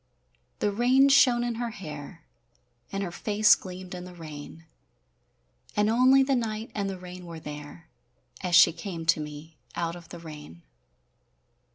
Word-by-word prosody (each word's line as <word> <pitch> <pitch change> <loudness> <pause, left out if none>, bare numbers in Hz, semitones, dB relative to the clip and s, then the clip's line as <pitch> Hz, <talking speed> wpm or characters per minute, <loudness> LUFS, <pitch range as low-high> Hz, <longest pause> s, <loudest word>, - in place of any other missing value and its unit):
The 205 - 0
rain 255 +6 +4
shone 255 -3 +5
in 240 -1 -2
her 240 - -1
hair, 155 -5 -9 0.7
And 195 0 -2
her 180 - -4
face 210 +4 +4
gleamed 185 0 -5
in 180 -1 -6
the 180 0 -11
rain; 160 0 -10 1.1
And 210 +1 +3
only 260 +3 +5
the 270 0 +1
night 220 -2 -3
and 200 -2 -2
the 190 - -5
rain 180 0 -10
were 165 -1 -8
there 150 +2 -9 0.5
As 180 -2 +1
she 170 - +8
came 165 -1 -6
to 165 -1 +4
me 150 +1 -8 0.2
out 170 0 -2
of 170 -1 -12
the 175 - -8
rain. 150 - -11
180 Hz, 160 wpm, -27 LUFS, 165-215 Hz, 1.1 s, she